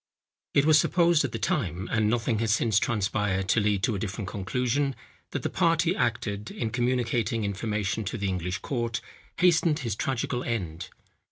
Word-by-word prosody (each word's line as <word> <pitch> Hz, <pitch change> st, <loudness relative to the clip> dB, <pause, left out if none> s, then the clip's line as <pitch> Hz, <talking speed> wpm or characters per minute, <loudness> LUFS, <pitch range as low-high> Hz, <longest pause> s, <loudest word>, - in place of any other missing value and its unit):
It 140 Hz, -, +5 dB
was 155 Hz, -1 st, +6 dB
supposed 170 Hz, -1 st, +3 dB
at 140 Hz, -, -2 dB
the -, -, -3 dB
time, 90 Hz, +6 st, -1 dB
and 110 Hz, -2 st, +2 dB
nothing 115 Hz, -1 st, 0 dB
has 115 Hz, -1 st, +1 dB
since 110 Hz, -2 st, +3 dB
transpired 100 Hz, -3 st, 0 dB
to -, -, +4 dB
lead 105 Hz, -2 st, +1 dB
to 115 Hz, -, +2 dB
a 100 Hz, -, -2 dB
different 100 Hz, 0 st, -4 dB
conclusion, 125 Hz, +7 st, -1 dB, 0.3 s
that -, -, -4 dB
the -, -, 0 dB
part 165 Hz, -2 st, +3 dB
he 170 Hz, +2 st, +1 dB
acted, 105 Hz, -3 st, -1 dB
in 115 Hz, -2 st, -3 dB
communicating 120 Hz, -2 st, 0 dB
information 105 Hz, +1 st, -2 dB
to 105 Hz, -, -3 dB
the 100 Hz, -2 st, -2 dB
English 90 Hz, 0 st, -2 dB
court, 120 Hz, -4 st, -2 dB, 0.4 s
hastened 170 Hz, -3 st, +4 dB
his 115 Hz, -5 st, -2 dB
tragical 125 Hz, 0 st, -2 dB
end. 90 Hz, -9 st, -3 dB
115 Hz, 175 wpm, -27 LUFS, 100-125 Hz, 0.4 s, was